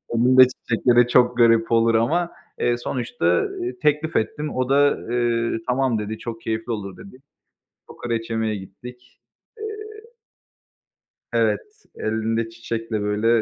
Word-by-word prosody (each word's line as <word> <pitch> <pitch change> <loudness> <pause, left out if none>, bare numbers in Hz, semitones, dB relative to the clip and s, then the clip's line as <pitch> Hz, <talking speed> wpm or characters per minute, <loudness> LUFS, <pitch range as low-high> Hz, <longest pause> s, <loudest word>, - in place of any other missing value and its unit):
Elinde 130 +2 +7
çiçekle 120 -1 0
de 120 0 +6
çok 125 0 +3
garip 115 -1 +4
olur 115 0 +3
ama, 165 +10 +1 0.3
eee, 120 0 +1
sonuçta, 125 - -4
ııı, 375 - 0
teklif 150 +2 +1
ettim. 150 +7 -1
O 130 0 -1
da, 145 +1 +4
eee, 120 -1 0
"Tamam", 125 -3 +1
dedi, 105 +1 -4
"Çok 115 0 -7
keyifli 110 +1 -3
olur." 100 -4 -5
dedi. 100 +6 -13 0.7
Kokoreç 115 -1 -4
yemeye 110 -1 -1
gittik. 125 +6 -12 0.4
Eee 430 -1 -5 1.6
Evet, - - +2 0.3
elinde 110 +1 -1
çiçekle, 115 -1 -4
böyle, 105 +2 0
115 Hz, 130 wpm, -22 LUFS, 115-130 Hz, 1.6 s, Elinde